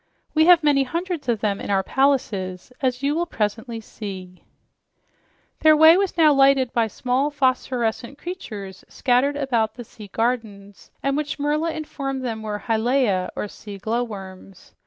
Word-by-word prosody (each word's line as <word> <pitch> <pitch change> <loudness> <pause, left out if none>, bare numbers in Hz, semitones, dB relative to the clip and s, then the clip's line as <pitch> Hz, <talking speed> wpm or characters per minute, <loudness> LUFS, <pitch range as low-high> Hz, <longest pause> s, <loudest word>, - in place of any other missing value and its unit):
"We 315 0 +4
have 350 -2 +7
many 290 -2 +4
hundreds 335 +1 -3
of 225 -3 0
them 205 -2 -1
in - - -6
our 195 -1 +2
palaces, 235 -8 0
as 255 -1 -1
you 285 +1 +2
will 340 +2 -1
presently 225 0 -3
see." 190 -5 -9 1.2
Their 310 -1 +6
way 320 +2 +8
was 385 -1 0
now 310 -3 +6
lighted 270 -2 +4
by 230 -2 +2
small, 255 +5 -1
phosphorescent 255 -2 -1
creatures 210 - -7
scattered 270 +3 +1
about 240 -6 0
the 240 - -8
sea 215 -2 -13
gardens 210 -3 -3
and 275 0 +1
which 295 0 -2
Merla 300 +3 0
informed 270 -4 -4
them 225 -2 -3
were 210 -1 -5
hyalaea, 225 -4 +1
or - - -3
sea 205 0 -10
glowworms. 195 -4 -6
250 Hz, 155 wpm, -23 LUFS, 210-285 Hz, 1.2 s, way